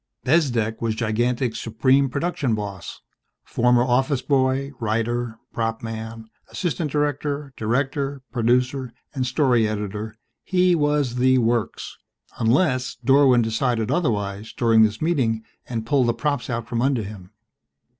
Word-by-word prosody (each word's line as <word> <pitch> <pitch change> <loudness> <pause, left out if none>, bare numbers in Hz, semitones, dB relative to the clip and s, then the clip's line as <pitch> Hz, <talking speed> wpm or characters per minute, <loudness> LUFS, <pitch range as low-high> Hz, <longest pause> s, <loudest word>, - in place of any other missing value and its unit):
Bezdek 125 -7 +1
was 115 -2 0
Gigantic's 120 +2 0
supreme 130 +5 +2
production 140 -4 -1
boss. 100 -4 -6 0.4
Former 120 0 +2
office 130 +2 +1
boy, 135 0 +1
writer, 115 +1 -1 0.2
prop 115 0 -2
man, 115 0 -6 0.2
assistant 160 -3 -2
director, 145 -1 -2
director, 135 +4 -1
producer, 125 +1 0 0.2
and 130 -3 -1
story 125 -4 +2
editor, 105 +1 -4 0.3
he 180 -1 +3
was 145 -5 +1
the 130 +1 +4
works 115 -2 -1 0.4
unless 130 +2 +2
Dorwin 135 -3 +5
decided 115 0 0
otherwise 105 - -1
during 115 -2 +4
this 110 +4 +2
meeting 125 -10 +1 0.3
and 115 -2 -3
pulled 130 0 +2
the 120 - +1
props 145 -2 -2
out 115 -1 -3
from 120 -1 -2
under 130 -3 +1
him. 100 -3 -9
125 Hz, 125 wpm, -23 LUFS, 115-135 Hz, 0.4 s, Dorwin